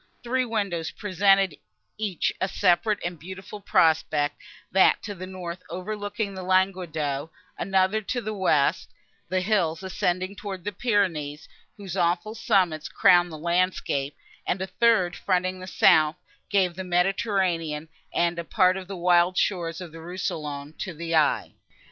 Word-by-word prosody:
Three 255 +1 0
windows 200 -8 -2
presented 195 -3 +2 0.4
each 205 -6 -1
a 190 - +2
separate 200 +3 +2
and 175 -2 -4
beautiful 190 +5 -9
prospect; 155 -5 +2 0.3
that 190 - +4
to 205 - -5
the 185 -1 -8
north, 180 -2 -7
overlooking 205 +3 -4
Languedoc; 180 -6 0 0.2
another 190 +3 +1
to 245 +4 -2
the 215 -2 -4
west, 170 -8 +1 0.4
the 185 0 +1
hills 180 -4 0
ascending 185 +1 -1
towards 190 -3 -6
the 205 - -3
Pyrenees, 175 -10 -1 0.3
whose 195 -3 -7
awful 175 +3 0
summits 185 -9 +1
crowned 175 -3 +4
the 155 - -7
landscape; 170 -4 0 0.3
and 180 - 0
a 190 - -2
third, 190 -2 +2
fronting 185 +1 0
the 185 - -8
south, 155 -4 +4 0.3
gave 190 -3 +2
the 190 +2 -6
Mediterranean, 180 -4 0 0.2
and 170 0 +1
a - - -3
part 185 +3 +3
of 185 -1 -7
the 195 -1 -6
wild 175 +1 +3
shores 170 -4 0
of 175 -3 -8
Rousillon, 160 -4 -5
to 185 -5 -5
the 165 +1 -4
eye. 155 -2 +2
185 Hz, 140 wpm, -25 LUFS, 165-195 Hz, 0.4 s, that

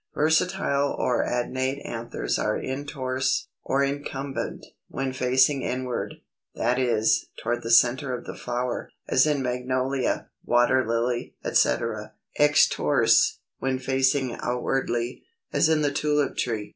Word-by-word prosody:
Versatile 155 -2 +1
or 125 - +1
adnate 130 +3 -2
anthers 115 0 -3
are - - 0
Introrse, 130 -1 -2
or 135 +1 +1
Incumbent, 140 -1 -4 0.2
when 135 -1 -3
facing 130 +2 +3
inward, 125 0 -3 0.4
that 120 +2 +1
is, 115 -3 +2
toward 120 +1 -2
the 115 - -5
centre 125 +3 +4
of - - -12
the - - -6
flower, 125 0 -3 0.2
as 130 +4 +4
in 145 -3 +1
Magnolia, 130 +1 -1
Water 120 +2 +3
Lily, 120 +1 -1
etc. - - +1 0.3
Extrorse, 150 0 +4 0.2
when 130 0 0
facing 130 0 +1
outwardly, 125 -1 -1 0.3
as - - +3
in 155 -1 +2
the 145 - +2
Tulip 150 -1 0
tree. 110 -4 -2
130 Hz, 120 wpm, -25 LUFS, 120-140 Hz, 0.4 s, centre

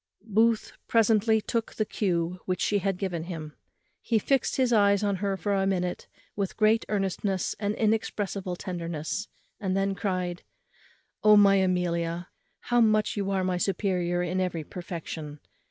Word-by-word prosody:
Booth 225 +1 +2 0.2
presently 220 -1 +4
took 230 +1 -3
the 215 - 0
cue 180 -4 -1
which 185 -1 -1
she 205 +1 +1
had 195 -1 -1
given 180 -4 -3
him. 160 -4 -6 0.5
He 230 - +1
fixed 265 +4 +1
his 255 -2 +2
eyes 200 -1 +4
on 200 -2 +1
her 195 0 -1
for 205 +1 -1
a 195 -1 +1
minute 180 -2 -1 0.3
with 200 -2 -3
great 220 +1 +3
earnestness 195 -1 -1
and 205 0 -1
inexpressible 205 -4 -1
tenderness; 170 +2 -4 0.3
and 190 -2 -1
then 195 0 +1
cried, 185 -3 -2 0.8
"O 210 0 +7
my 200 -1 +6
Amelia, 175 -2 0 0.3
how 240 0 +2
much 215 -1 +3
are - - -2
you 195 -1 0
my 185 -1 0
superior 180 -2 0
in 180 +2 -1
every 175 -3 -2
perfection! 160 -3 -7
195 Hz, 155 wpm, -27 LUFS, 180-210 Hz, 0.8 s, O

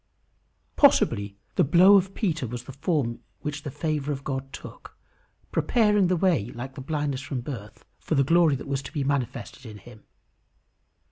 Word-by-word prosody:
Possibly 100 - +3 0.2
the 180 - +5
blow 180 +7 +6
of 195 0 +2
Peter 165 - -1
was 120 +1 -6
the 135 - -9
form 135 -4 -1 0.2
which 150 -1 -4
the 145 - -5
favour 150 0 -2
of 140 -1 -4
God 135 -1 -4
took, - - -11 0.5
preparing 210 -5 +3
the 180 0 +1
way, 165 - +2
like 130 +3 -6
the 135 - -8
blindness 145 -1 -2
from 130 -2 -4
the 145 - -5
birth, 105 -4 -9
for 160 - -2
the 140 - +4
glory 165 0 +4
that 135 - -7
was 140 -1 -1
to - - -9
be 145 - -2
manifested 135 -1 -3
in 110 -4 -9
him. 105 +2 -15
140 Hz, 180 wpm, -26 LUFS, 130-165 Hz, 0.5 s, blow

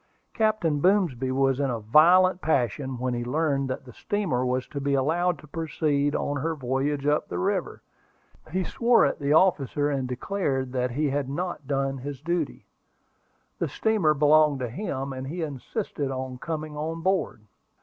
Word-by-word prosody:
Captain 215 -9 +1
Boomsby 165 - +2
was 135 0 +2
in 140 -1 +1
a 120 -2 -2
violent 175 - +5
passion 130 -2 0
when 125 0 -2
he 120 0 -2
learned 140 +1 0
that 130 - -4
the 125 - -12
steamer 185 -12 -1
was 125 0 -1
to 140 - -5
be 140 0 +1
allowed 170 +6 +1
to - - -14
proceed 150 -2 -1
on 145 0 -1
her 160 +4 -1
voyage 135 +1 -1
up 150 +1 +1
the 85 - -3
river. 90 - -2 0.7
He 185 +3 -1
swore 235 -1 +3
at 140 - -1
the 140 0 -1
officer, 150 -4 +3
and 135 -2 -1
declared 135 -1 -2
that 125 -1 0
he 145 +3 -1
had 140 -1 -1
not 170 -1 -4
done 135 -1 -1
his 140 +1 -6
duty. 170 +4 -2 0.9
The - - 0
steamer 200 -9 +2
belonged 150 0 +4
to 125 - -2
him, 135 - -4
and 130 0 -6
he 165 +4 -4
insisted 145 - -4
on 130 -1 -5
coming 155 -1 -4
on 160 +2 -4
board. 185 - 0
145 Hz, 170 wpm, -26 LUFS, 130-165 Hz, 0.9 s, violent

